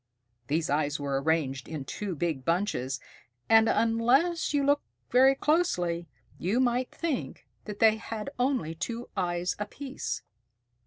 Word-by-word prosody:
These 155 +3 0
eyes 145 0 +1
were 140 -1 -1
arranged 140 -4 0
in 155 -4 -5
two 195 +5 -4
big 155 -4 -2
bunches, 165 -6 0 0.5
and, 225 0 +6
unless 245 +10 +2
you 290 -1 +2
looked 285 +1 +2 0.2
very 265 +2 +6
closely, 180 - +1 0.3
you 200 +8 +1
might 250 0 +1
think 325 -6 -3 0.2
that 210 -2 -6
they 220 0 +5
had 220 +2 -5
only 250 - +1
two 230 +9 -5
eyes 175 -2 -1
apiece. 265 +6 -5
210 Hz, 135 wpm, -28 LUFS, 160-255 Hz, 0.5 s, and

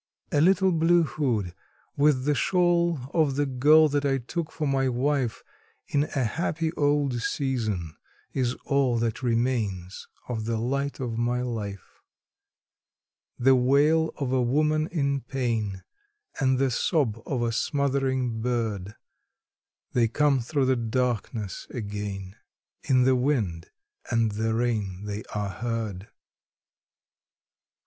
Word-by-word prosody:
A 145 - +3
little 190 +2 +4
blue 170 +1 +4
hood, 120 - -1 0.4
with 140 -3 +3
the 150 - +3
shawl 175 +1 +2 0.2
of 155 -5 +2
the 145 +1 +1
girl 145 +4 +5
that 145 0 0
I 135 -1 +2
took 155 +6 -4
for 155 - -3
my 135 -1 +1
wife 130 -1 0 0.5
In 145 +1 +2
a 135 -4 -2
happy 160 +6 -1
old 145 -5 +1
season, 110 - -2 0.4
is 125 -2 0
all 135 -4 +2
that 115 0 -1
remains 115 -7 -1 0.2
of 115 -3 -3
the 115 0 -1
light 140 +5 -2
of 120 -3 -3
my 120 +1 0
life; 105 -6 -6 1.4
The 135 +2 +5
wail 145 +6 +3
of 135 -4 -2
a 130 -1 +2
woman 155 +5 +2
in 140 -5 -1
pain, 115 -7 -2 0.6
and 130 -2 +2
the 135 0 +1
sob 120 - 0
of 125 -4 -1
a 115 - 0
smothering 130 -3 0
bird, 110 -5 -2 1.0
They 120 -2 +3
come 145 +3 +2
through 135 +3 0
the 130 0 +3
darkness 115 -3 -2
again 100 -4 -5 0.4
in 130 -2 +3
the 130 0 +4
wind 115 - -1 0.4
and 115 -1 +2
the 110 +2 -1
rain 105 -5 -1
they 105 0 -4
are 105 -1 -1
heard. 110 -3 -4
125 Hz, 130 wpm, -26 LUFS, 115-145 Hz, 1.4 s, girl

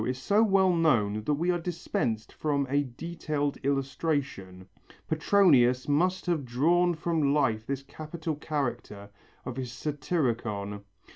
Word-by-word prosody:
Trimalcho 110 - -2
is 125 - -2
so 200 +11 +2
well 195 -4 +4
known 110 -11 +2
that 150 - +2
we 170 +5 +1
are 175 - 0
dispensed 125 -10 -3
from 145 -2 0
a 145 0 +2
detailed 145 +1 -3
illustration. 135 - -2 0.4
Petronius 150 -7 +4
must 180 +6 +1
have 170 -5 0
drawn 170 +8 +2
from 155 -3 +1
life 115 -7 +1
this 140 0 -3
capital 155 +3 -5
character 120 -9 -4 0.3
of 125 0 -5
his 125 -2 -4
Satyricon. 120 - -2
145 Hz, 135 wpm, -28 LUFS, 120-165 Hz, 0.4 s, well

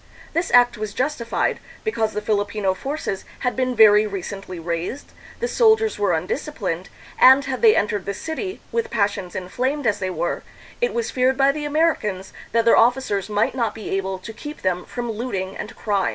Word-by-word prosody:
This 335 +2 0
act 245 -2 +5
was 215 -1 -4
justified, 255 -3 -1 0.2
because 225 - -1
the 210 - -3
Filipino 205 -2 0
forces 265 -3 -4 0.2
had 250 -2 0
been 255 -1 0
very 215 -1 +7
recently 195 -1 -6
raised, 170 - -4 0.3
the 475 - 0
sol 450 -2 +5
diers 440 - -2
were 205 -2 +2
undisciplined, 185 - -3 0.3
and 265 +2 +7
had 265 -1 -3
they 445 -2 +7
entered 205 -2 0
the 200 - -2
city, 375 - -5
with 465 0 -1
passions 200 - -1
inflamed 255 +10 -2
as 210 -2 +2
they 190 -1 -2
were, 175 -1 -2 0.4
it 485 - 0
was 470 -1 -1
feared 260 +1 +2
by 275 0 +5
the 295 +1 -4
Americans 290 - 0 0.2
that 230 0 +2
their 230 - +6
officers 230 -5 +2
might 210 0 +1
not 235 -3 -1
be 220 - -7
able 190 0 -2
to 205 +5 -9
keep 295 +7 -9
them 180 -1 0
from 240 -1 -4
looting 200 -4 -4
and 230 +3 -7
crime. 200 -3 0
220 Hz, 185 wpm, -22 LUFS, 195-275 Hz, 0.4 s, very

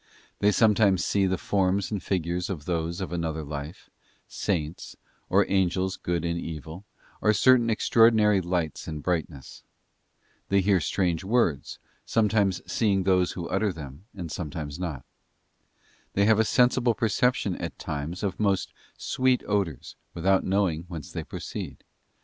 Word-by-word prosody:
They 105 - +4
sometimes 105 -3 +3
see 100 -1 +2
the 95 0 0
forms 95 +2 0
and 105 -3 -2
figures 90 0 -2
of 80 -7 -5
those 85 0 -2
of 95 - -4
another 80 -2 -2
life, 75 +2 -7 0.4
Saints, 85 -5 -3 0.3
or - - +4
Angels 95 0 +1
good 85 -1 -2
and 85 0 -1
evil, 80 +4 -7 0.4
or 110 - +4
certain 120 0 +4
extraordinary 110 -2 +4
lights 85 -4 -2
and 75 -2 -5
brightness. 80 -6 -3 0.9
They 100 - +4
hear 95 0 +3
strange 85 +2 0
words, 95 - 0 0.3
sometimes 105 -4 +1
seeing 100 -4 +1
those 90 -1 +2
who 85 -2 -5
utter 100 +1 +1
them, 75 +1 -10
and 85 -5 -6
sometimes 75 -2 -5
not. 80 -8 -4 1.1
They 100 - +3
have 110 0 +4
a 110 - +4
sensible 125 +1 +3
perception 120 -2 +1
at - - -6
times 75 +6 -5
of 100 - -2
most 100 -3 0 0.2
sweet 130 -1 +1
odours, 100 -9 -2 0.2
without 95 +3 +2
knowing 95 -4 0
whence 85 -4 -8
they - - -4
proceed. - - -7
95 Hz, 145 wpm, -26 LUFS, 85-105 Hz, 1.1 s, They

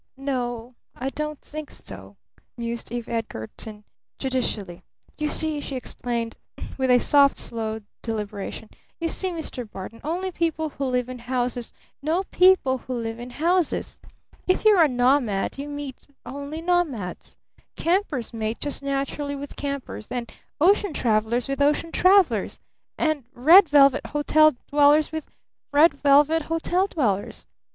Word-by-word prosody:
"N 275 +1 -5
o, 245 -2 -3 0.2
I 265 +2 -3
don't 300 0 -4
think 305 -1 -8
so," - - -10 0.4
mused 235 -1 -4
Eve 240 -1 -4
Edgarton 215 - -6 0.3
judicially. 225 -9 -2 0.4
"You 300 0 0
see," 310 -2 +1
she 275 - -5
explained 235 -2 -4 0.4
with 255 -2 +3
soft, 280 -1 +5
slow 220 -1 -3 0.2
deliberation, 210 -1 -5 0.3
"you 335 - -1
see, 375 +3 -1
Mr. 310 -9 -6
Barton, 210 +4 -9
only 355 +5 -2
people 320 -2 -1
who 275 -1 -4
live 250 -1 0
in 255 -1 -7
houses 245 0 -2 0.3
know 325 +6 0
people 360 -8 +4
who 255 - -5
live 225 -1 -4
in 240 +1 -7
houses! 335 +5 0 0.5
If 370 +4 +1
you're 415 -5 +7
a 320 - +6
nomad 245 -4 +1
you 285 +1 -5
meet 290 -2 -7 0.2
only 285 +5 -6
nomads! 320 - -1 0.4
Campers 335 - -1
mate 220 0 -3
just 290 -1 -3
naturally 280 +1 -2
with 285 0 -8
campers, 280 -6 -5
and 240 -2 -4 0.3
ocean 385 +2 +3
travelers 230 0 +1
with 275 +1 -2
ocean 300 +3 +2
travelers 365 - +3 0.4
and 310 -4 0
red 325 +8 +7
velvet 275 -2 +5
hotel 305 0 +4 0.2
dwellers 295 +1 +5
with 315 -2 -5 0.4
red 295 +2 +6
velvet 290 +3 +4
hotel 350 +3 +1
dwellers. 210 - -2
275 Hz, 140 wpm, -24 LUFS, 240-310 Hz, 0.5 s, you're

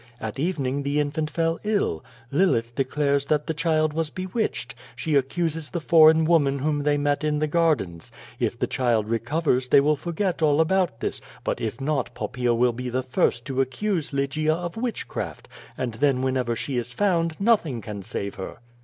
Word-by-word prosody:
At 110 +2 -5
evening 145 -4 -1
the 140 +1 0
infant 150 +1 -1
fell 165 0 0
ill. 205 - 0 0.3
Lilith 135 -8 +2
declare 140 +2 +1
that 150 +2 0
the 160 - -1
child 155 -1 +1
was 160 -1 -1
bewitched. 185 - -3 0.2
She 150 +5 -2
accuses 155 +2 0
the 170 - -3
foreign 160 0 +6
woman 145 -4 +3
whom 145 +1 0
they 145 0 +2
met 145 +1 0
in 150 -1 +1
the 155 - +1
gardens. 150 - 0 0.3
If - - -1
the - - 0
child 115 -4 +1
recovers 125 +3 0
they - - +7
will 150 +2 +3
forget 175 +3 -2
all 150 -1 +3
about 170 -7 +1
this, - - -2 0.2
but - - -2
if 115 +2 -3
not 135 -2 -1
Pop - - -4
paea 125 -1 +1
will 120 0 +3
be 125 +2 -4
the 130 +1 -1
first 120 -2 0
to 135 -1 0
accuse 160 +5 -1
Lygia 150 +3 0
of 175 0 -5
witchcraft, 230 0 -4 0.3
and 125 -3 -2
then 130 +1 +1
whenever 130 -3 0
she 130 +3 -3
is 120 +1 -6
found 170 -1 0
nothing 200 - +2
can 105 -2 -7
save 100 0 -4
her." - - -6
145 Hz, 185 wpm, -25 LUFS, 125-165 Hz, 0.3 s, they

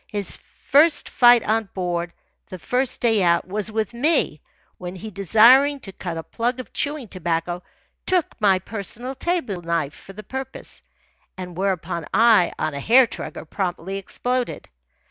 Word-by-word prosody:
His 205 -3 -2 0.2
first 295 +2 +3
fight 240 -2 +6
on 220 +1 +1
board, 175 -2 -2 0.4
the 185 - -8
first 250 +8 -1
day 225 -4 +3
out, 170 -1 +2
was 210 +3 -2
with 220 0 -2
me, 295 +8 +1 0.4
when 180 0 -6
he, 215 +4 -8
desiring 235 - +5
to 195 - -9
cut 175 -3 -6
a 165 - -5
plug 240 +6 -2
of 255 - -9
chewing 290 -4 -3
tobacco, 175 -1 -2 0.5
took 365 -4 +3 0.2
my 195 -3 +5
personal 220 +6 -5
table 265 - -2
knife 165 -4 -1
for 195 - -13
the 215 +2 -10
purpose, 265 +5 -6 0.6
and 180 -2 -7
whereupon, 180 -3 -2
I, 220 -3 +5
on 155 - -2
a 140 - -4
hair 245 - +6
trigger, 160 -8 -7
promptly 185 +2 -3
exploded. 250 +5 -2
205 Hz, 155 wpm, -22 LUFS, 180-245 Hz, 0.6 s, fight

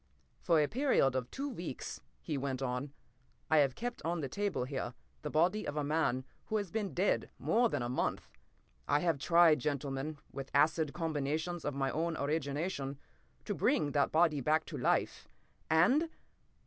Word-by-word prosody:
p> - - -38 0.3
"For 165 -3 +3
a 150 - +3
period 240 - +2
of 125 -1 -2
two 275 +2 -4
weeks," 175 - -6 0.2
he 155 - -2
went 135 -1 -2
on, 125 +2 -2 0.6
"I 160 - +6
have 140 -3 +4
kept, 240 +5 -4
on 170 +1 -1
the 140 - -2
table 200 +1 -1
here, 130 +1 -4 0.3
the - - -4
body 175 +7 +2
of 145 - -3
a 150 - +1
man 145 -4 0 0.2
who 220 - 0
has 200 -5 -3
been 210 -3 -2
dead 190 +3 +1
more 235 +1 +2
than 120 - -1
a - - -1
month. 125 - -1 0.6
I 145 +1 +3
have 165 -5 +1
tried, 165 +2 +5
gentlemen, 140 +2 -2
with 135 0 -6
acid 155 +1 +3
combinations 160 +1 -2
of 145 - -2
my 135 -1 0
own 165 +1 -1
origination, 140 0 -2 0.5
to - - -1
bring 145 -1 +2
that 140 -1 +2
body 155 -3 +3
back 155 +5 +2
to - - -5
life. - - 0 0.4
And 245 - +4
155 Hz, 175 wpm, -33 LUFS, 140-175 Hz, 0.6 s, I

